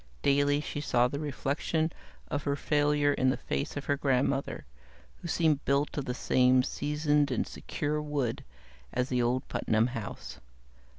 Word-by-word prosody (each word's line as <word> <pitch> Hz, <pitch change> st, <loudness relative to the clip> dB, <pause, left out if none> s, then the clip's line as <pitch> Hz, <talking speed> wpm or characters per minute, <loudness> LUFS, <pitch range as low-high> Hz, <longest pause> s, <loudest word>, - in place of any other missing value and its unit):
Daily 145 Hz, +1 st, +3 dB
she 145 Hz, -, -4 dB
saw 125 Hz, -4 st, +3 dB
the 140 Hz, +3 st, -4 dB
reflection 155 Hz, +2 st, -1 dB, 0.4 s
of 145 Hz, -, -2 dB
her 140 Hz, 0 st, 0 dB
failure 145 Hz, 0 st, +2 dB
in 130 Hz, -1 st, +2 dB
the -, -, +1 dB
face 70 Hz, -, -3 dB
of 145 Hz, -, -4 dB
her 145 Hz, -, +1 dB
grandmother, 135 Hz, 0 st, 0 dB, 0.5 s
who 175 Hz, -, -8 dB
seemed 160 Hz, -4 st, +2 dB
built 140 Hz, +2 st, +1 dB
of 145 Hz, -, -2 dB
the 125 Hz, -, -3 dB
same 125 Hz, 0 st, +4 dB
seasoned 150 Hz, +1 st, +1 dB
and 125 Hz, -, 0 dB
secure 150 Hz, +1 st, -3 dB
wood 145 Hz, -6 st, -2 dB, 0.5 s
as 125 Hz, +1 st, -1 dB
the 125 Hz, -1 st, +1 dB
old 125 Hz, +2 st, 0 dB
Putnam 110 Hz, +1 st, +1 dB
house. 115 Hz, -5 st, -6 dB
140 Hz, 160 wpm, -30 LUFS, 130-150 Hz, 0.5 s, same